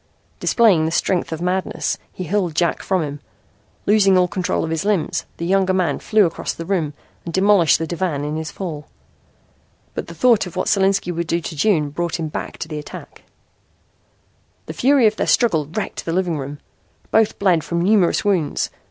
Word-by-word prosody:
Displaying 200 -10 +4
the 160 - -1
strength 175 +1 0
of 160 +1 -4
madness 185 +1 -1
he 185 - -6
hurled 180 -2 -1
Jack 170 0 +1
from 185 -3 0
him. 145 -1 -5 0.7
Losing 195 -2 +4
all 180 0 +4
control 180 0 -1
of 160 - -3
his 165 +2 -1
limbs, 200 -6 -1
the 170 - -4
younger 190 +1 +2
man 185 -2 0
flew 215 -2 +3
across 165 - -3
the 165 - -6
room 165 -6 -1 0.3
and 170 - -6
demolished 190 -2 +4
the 165 - -3
divan 165 -4 -2
in 150 +1 -3
his 160 -1 -4
fall. 155 -6 -6 1.1
But - - -5
the 170 - -10
thought 225 +1 +3
of 180 - -11
what 185 - -1
Solinski 195 -2 +2
would 170 0 -3
do 170 0 +1
to 160 - -6
June 155 -4 +1
brought 170 +2 -2
him 160 -1 -3
back - - -6
to - - -5
the 155 -2 -5
attack. 150 - -11 1.4
The - - -6
fury 270 -2 +3
of 215 0 +3
their - - -1
struggle 165 - +2
wrecked 185 +7 -4
the 165 - -3
living 175 -4 0
room. 140 +2 -6 0.5
Both 220 -1 +3
bled 180 -5 +2
from 170 0 -1
numerous 200 -1 +3
wounds. 185 -7 0
175 Hz, 190 wpm, -20 LUFS, 160-195 Hz, 1.4 s, Displaying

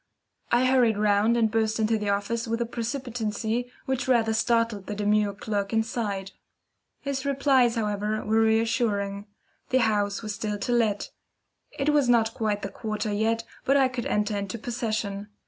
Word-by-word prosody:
I 240 +2 +4
hurried 250 -4 +3
round 210 +2 +3
and 225 -2 +2
burst 220 0 0
into 220 +1 +2
the 210 -1 -2
office 205 +4 -1
with 230 +1 -1
a 235 - 0
precipitancy 235 -1 -3
which 265 0 -1
rather 230 -3 +3
startled 230 -3 +1
the 210 - -4
demure 210 -1 +1
clerk 205 -1 -2
inside. 220 -4 -1 0.7
His 275 -2 -3
replies, 270 -3 +3
however, 210 -1 -1
were 220 +1 +3
reassuring. 220 -3 +1 0.4
The 260 0 +3
house 205 -2 0
was 215 -1 -3
still 210 0 -3
to 205 - -3
let. 220 -4 +1 0.7
It 280 0 +1
was 290 -4 +3
not 225 -2 +3
quite 210 -2 -1
the 200 - -3
quarter 215 +1 -3
yet, 225 +2 0 0.2
but 275 +1 +3
I 265 -2 +4
could 250 -2 -4
enter 210 0 0
into 200 +2 -3
possession. 215 -3 -3
225 Hz, 165 wpm, -26 LUFS, 210-240 Hz, 0.7 s, I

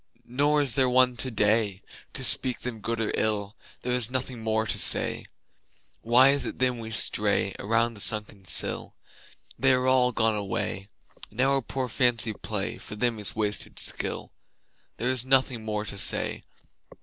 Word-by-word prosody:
Nor 145 +4 0
is 135 - -2
there 130 -2 +1
one 125 0 +3
today 105 -5 -1 0.3
To - - -4
speak 125 -2 +3
them 120 -3 -6
good 115 +2 -4
or 110 - -2
ill: 105 -1 -2 0.3
There 125 - -3
is 125 -2 -1
nothing 125 -2 -4
more 110 0 -1
to - - -3
say. - - +4 0.8
Why 125 +4 +5
is 140 - 0
it - - -6
then 125 -1 -1
we 110 -1 -8
stray 105 -3 +1
Around 115 +3 -1
the 105 - -13
sunken 105 -2 +1
sill? - - +2 0.6
They 135 0 +3
are 125 0 0
all 130 -1 +2
gone 110 -2 +1
away. 100 -1 -5 0.4
And 110 - -17
our 135 +1 +1
poor 130 +1 -5
fancy 115 -1 +1
play - - -4
For - - -9
them 115 0 -1
is 105 - +3
wasted 105 -1 -4
skill: - - +1 0.7
There 120 - -3
is 130 -2 +1
nothing 130 -3 +1
more 105 -1 -4
to 100 - -6
say. - - +2
115 Hz, 170 wpm, -25 LUFS, 105-130 Hz, 0.8 s, Why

